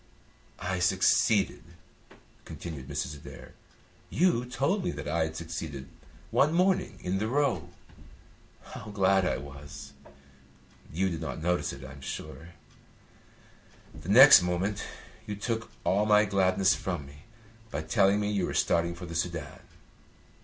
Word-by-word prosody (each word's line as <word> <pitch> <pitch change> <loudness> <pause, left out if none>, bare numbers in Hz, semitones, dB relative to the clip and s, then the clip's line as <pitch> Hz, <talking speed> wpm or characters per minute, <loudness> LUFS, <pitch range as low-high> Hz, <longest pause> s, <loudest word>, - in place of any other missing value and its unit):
"I 95 0 -3
succeeded," 95 +3 +2 0.8
continued 75 -6 -8
Mrs. 70 - -3
Adair. 70 - -12 0.6
"You 165 -9 +2
told 140 +10 -1
me 180 - -1
that - - -6
I 80 +1 +1
had 80 0 -6
succeeded 80 -5 -6 0.4
one 150 +3 +3
morning 180 - +1
in 95 +2 -1
the 110 - -1
Row. 125 - 0 0.9
How - - -10
glad 95 -2 +2
I - - 0
was! 70 0 -10 1.0
You 95 +4 0
did 85 -3 -5
not - - -5
notice 90 +1 0
it, - - -9
I 65 - -9
am 70 +1 -12
sure. 80 +6 -8 1.4
The 90 - -10
next 130 +1 +10
moment 90 +4 -1 0.4
you 105 - -3
took 115 +2 -3
all 105 +3 +2
my 105 0 +5
gladness 95 -1 +3
from 75 -2 -4
me 70 +1 -15 0.4
by 75 -4 -4
telling 100 +4 +3
me 105 0 -1
you 100 -4 0
were - - -4
starting 85 0 +1
for 85 - -8
the 85 - -8
Soudan. 85 -3 -3
95 Hz, 140 wpm, -28 LUFS, 80-105 Hz, 1.4 s, next